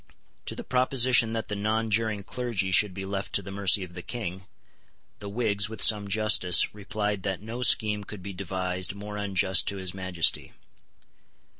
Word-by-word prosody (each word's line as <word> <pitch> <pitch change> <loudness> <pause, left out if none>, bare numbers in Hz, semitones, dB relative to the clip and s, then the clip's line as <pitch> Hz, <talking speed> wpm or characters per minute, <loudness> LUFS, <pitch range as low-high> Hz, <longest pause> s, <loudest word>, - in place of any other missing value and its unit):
To - - -2
the - - -7
proposition 125 -2 +3
that 115 -1 -4
the 105 - -4
nonjuring 110 0 -1
clergy 115 -7 -3
should 105 +1 +5
be 95 0 -5
left 95 0 -5
to 100 - 0
the 100 - -9
mercy 100 0 +3
of 90 -1 -10
the 90 - -7
King, 95 -4 -6 0.7
the 100 - -7
Whigs, 105 -2 0
with 110 - -9
some 105 -2 +4
justice, 100 -4 +4
replied 105 0 -3
that 95 -1 -3
no 115 +4 -7
scheme 105 -3 +3
could 100 -2 -10
be 100 +1 -7
devised 95 0 -3
more 105 +1 -8
unjust 95 -2 0
to 100 - -2
his 95 -2 -4
Majesty. 95 -3 0
100 Hz, 170 wpm, -26 LUFS, 95-110 Hz, 0.7 s, should